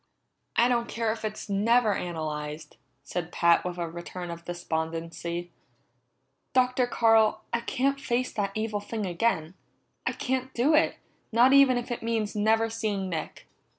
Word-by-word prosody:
"I 235 - +5
don't 235 -1 +1
care 230 -1 -1
if 220 - -6
it's 215 0 -4
never 215 +2 +3
analyzed," 155 -3 -5 0.3
said 170 +4 -4
Pat 170 0 +4
with 180 -1 -4
a 170 -1 -2
return 175 +1 -7
of 170 0 -8
despondency. 170 0 -4 1.0
"Dr. 255 -1 +3
Carl, 225 -2 +3
I 235 - +2
can't 275 +4 0
face 250 +1 -1
that 200 -2 -1
evil 215 -1 -1
thing 210 +1 -4
again. 175 -3 0 0.5
I - - +1
can't 260 0 -2
do 265 +7 +3
it, 310 +1 +4 0.4
not 240 +4 +5
even 275 -2 +6
if 245 0 -4
it 240 - -3
means 225 -2 -1
never 220 +2 +3
seeing 215 -4 -2
Nick!" 160 -3 -5
215 Hz, 150 wpm, -27 LUFS, 175-235 Hz, 1.0 s, even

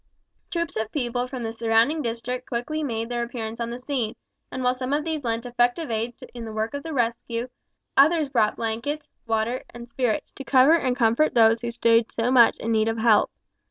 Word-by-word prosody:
Troops 335 -1 -3
of 220 0 -2
people 245 -2 -1
from 255 -2 -6
the 225 0 -3
surrounding 230 +7 +2
district 245 +1 -4
quickly 250 +6 -2
made 230 -6 -2
their 240 0 -2
appearance 230 -1 -5
on 235 0 -2
the 240 - -5
scene, 250 -4 -3 0.4
and 260 - -4
while 250 0 +3
some 255 +1 -3
of 295 +1 +1
these 315 -3 -2
lent 230 0 -2
effective 245 +4 0
aid 225 +2 -2 0.2
in 240 -1 -7
the 225 - -6
work 220 +3 -2
of 285 0 -4
rescue, 235 -4 -2 0.5
others 310 +2 +5
brought 225 -6 +1
blankets, 245 +7 -3 0.2
water, 225 +3 0
and 240 0 -10
spirits, 240 -2 -1
to 270 - -9
cover 265 +4 +5
and 255 -7 +2
comfort 240 +4 +2
those 225 -1 +5
who 235 - -3
stood 230 -1 +2
so 235 +2 0
much 240 -3 +6
in 230 - -3
need 220 0 +2
of 225 0 -1
help. 220 -2 +4
240 Hz, 200 wpm, -24 LUFS, 230-260 Hz, 0.5 s, much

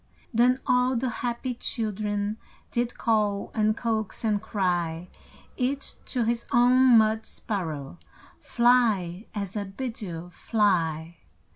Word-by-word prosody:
Then 245 +3 +4
all 250 +1 +3
the 250 +2 0
happy 245 +1 -2
children 210 -2 -2 0.3
Did 240 0 -1
call, 210 -3 0
and 215 0 +1
coax, 220 -3 -2
and 210 -2 +1
cry 175 -5 -1 0.5
Each 270 +2 -1
to 250 -3 -1
his 235 +1 0
own 250 0 +6
mud 220 0 +3
sparrow: 160 -8 -4 0.4
"Fly, 225 -6 +2
as 200 -1 -4
I 205 -1 -2
bid 225 +5 -5
you! 175 -3 -6
Fly!" 170 -6 0
215 Hz, 120 wpm, -26 LUFS, 190-240 Hz, 0.5 s, own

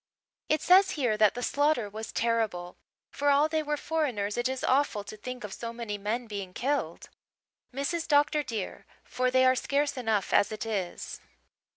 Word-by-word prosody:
It 310 0 +1
says 380 +2 +6
here 245 -6 +1
that 215 0 +4
the 245 - -4
slaughter 285 -6 +1
was 220 +2 -7
terrible. 220 -7 -1 0.4
For 290 0 0
all 285 +2 +5
they 315 0 0
were 300 0 -2
foreigners 255 -12 -1
it 240 +1 0
is 260 -1 -4
awful 260 -6 +2
to 210 - -9
think 250 +3 -7
of 205 -2 -6
so 230 -1 -5
many 230 -3 -5
men 225 +5 -2
being 200 -4 -6
killed, 255 - -2 0.6
Mrs. 280 +6 -2
Dr. 295 0 +3
dear 225 -8 -5 0.2
for 255 0 -1
they 260 0 +4
are 255 - +6
scarce 280 +2 0
enough 220 -5 0
as 200 - +4
it 215 +1 -4
is." 200 -5 -4
245 Hz, 180 wpm, -28 LUFS, 215-285 Hz, 0.6 s, says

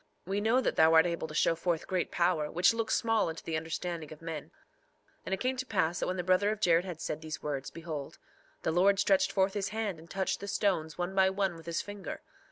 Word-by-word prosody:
We 195 +3 -1
know 230 +4 +3
that - - -1
thou 160 +1 +6
art 160 +1 +7
able 170 -2 -2
to 155 - -9
show 165 - +3
forth 165 0 -1
great 185 -2 -1
power, 170 -4 +1
which 175 +7 +4
looks 230 -1 0
small 225 -5 +2
unto 160 - -7
the 165 - -3
understanding 160 0 -4
of 155 - -10
men. 165 -2 -5
3:6 - - -27 0.8
And - - -1
it - - -13
came 255 +1 0
to 260 - -2
pass 175 -4 +1
that - - -1
when 185 - -2
the 180 - -1
brother 185 +3 +3
of 215 0 -2
Jared 175 -3 +3
had 175 -4 -6
said 155 - -4
these 160 +1 -6
words, 140 -3 -3
behold, 155 -4 -6 0.5
the - - +1
Lord 195 +4 +4
stretched 195 -1 +3
forth 190 0 +2
his 205 -1 -2
hand 215 -6 -3
and 165 +1 -15
touched 190 -1 -1
the 200 - -7
stones 180 -7 0
one 175 +1 -2
by 190 -1 +4
one 190 -2 0
with 165 0 -13
his 170 0 -1
finger. 205 -1 -7
180 Hz, 250 wpm, -31 LUFS, 160-200 Hz, 0.8 s, art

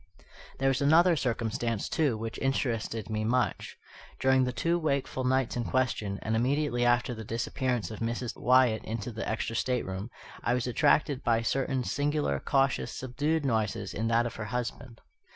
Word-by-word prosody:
There 135 - +1
was 135 0 0
another 165 +5 +5
circumstance, 115 -4 -1
too, 145 -9 +1
which 115 +1 -5
interested 115 -5 -1
me 110 -1 -2
much. 125 +3 -1 0.4
During 130 0 +4
the 125 - -1
two 170 +7 0
wakeful 140 -4 -1
nights 130 -1 +1
in 120 - -1
question, 115 -6 -1
and 110 +1 0
immediately 130 +1 +1
after 120 0 +2
the 110 -1 -7
disappearance 115 -1 -2
of 110 - -7
Mrs. 115 +1 -3
Wyatt 125 -3 +3
into 115 +1 -4
the 110 0 -4
extra 115 +1 -2
stateroom, 115 -5 -2 0.3
I 120 - +2
was 125 - -1
attracted 140 +2 +2
by 115 -1 +2
certain 130 +1 0
singular, 145 - 0
cautious, 135 - +1
subdued 145 +5 -1
noises 110 -4 -1
in 110 +2 -1
that 115 +1 +3
of 120 - -3
her 110 - -4
husband. 120 +1 -5
120 Hz, 165 wpm, -29 LUFS, 115-135 Hz, 0.4 s, another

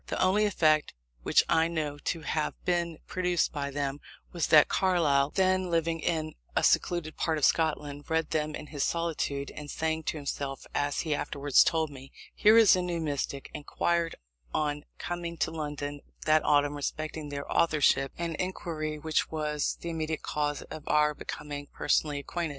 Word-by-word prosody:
The - - -3
only 195 +3 +3
effect 155 - +2 0.3
which - - +4
I 160 0 +3
know 155 -3 -3
to 165 +2 -2
have 155 0 -1
been 170 -2 0
produced 180 -2 0
by 140 -2 -2
them, 140 0 -2 0.3
was 170 -2 -1
that 150 -2 +7
Carlyle, 155 -7 +2
then 185 +1 +1
living 165 -1 0
in 155 -1 -1 0.2
a - - +2
secluded 170 -3 +2
part 160 -1 0
of 150 - +3
Scotland, 145 -2 0
read 160 -1 0
them 155 -1 -1
in - - -7
his 145 - 0
solitude, 155 -4 -1
and, 150 -1 -8
saying 160 +1 -2
to - - -2
himself 140 -1 -4
(as 145 0 0
he 155 -3 -1
afterwards 140 -1 +3
told 160 -2 0
me) 135 -1 -11 0.2
"Here 215 +2 +6
is 225 -4 +8
a 185 - 0
new 175 -1 -2
Mystic," 140 -3 -3
inquired 165 +3 -1 0.4
on 150 -1 -1
coming 170 -1 -4
to - - 0
London 145 -2 -4 0.2
that 155 0 +4
autumn 145 0 +3
respecting 155 +1 -4
their 140 0 -5
authorship; 150 -4 +3
an 170 -1 -2
inquiry 160 -4 -3
which 155 +1 0
was 150 -2 -1
the 170 - -4
immediate 160 -1 -3
cause 145 -1 -2
of 155 - -8
our 150 0 +3
becoming 145 -1 -6
personally 150 -2 +1
acquainted. 165 +4 -3
155 Hz, 170 wpm, -29 LUFS, 145-170 Hz, 0.4 s, is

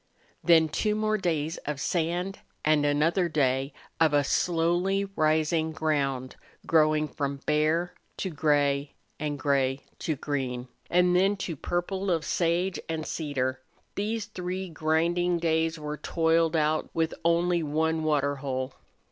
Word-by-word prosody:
Then 165 -2 +6
two 210 +7 0
more 215 0 0
days 160 -3 -1
of 150 -1 -5
sand 175 +6 -1 0.3
and 150 -1 +3
another 165 +5 +2
day 135 -2 +1 0.3
of 155 -2 +4
a 145 - +4
slowly 175 +6 +1
rising 155 +1 +2
ground 135 -5 -1 0.3
growing 155 -1 +3
from 140 -2 -3
bare 155 +4 +1 0.2
to 190 - -3
gray 145 -2 +1 0.2
and 150 -1 -2
gray 135 -1 +1 0.2
to 160 - -1
green, 130 -3 -3 0.2
and 180 0 +3
then 195 +3 +3
to 170 - -3
the 145 - -13
purple 190 +2 -2
of 165 -3 +1
sage 175 +2 0
and 160 -1 -2
cedar 130 -4 -2 0.3
these 215 +2 -2
three 185 -2 -5
grinding 170 +2 +1
days 165 -1 +1
were 150 0 -5
toiled 165 0 +1
out 155 0 +1
with 165 -1 +1
only 170 +1 +2
one 160 +1 0
water 145 -2 +1
hole. 130 -1 -3
160 Hz, 140 wpm, -27 LUFS, 145-175 Hz, 0.3 s, Then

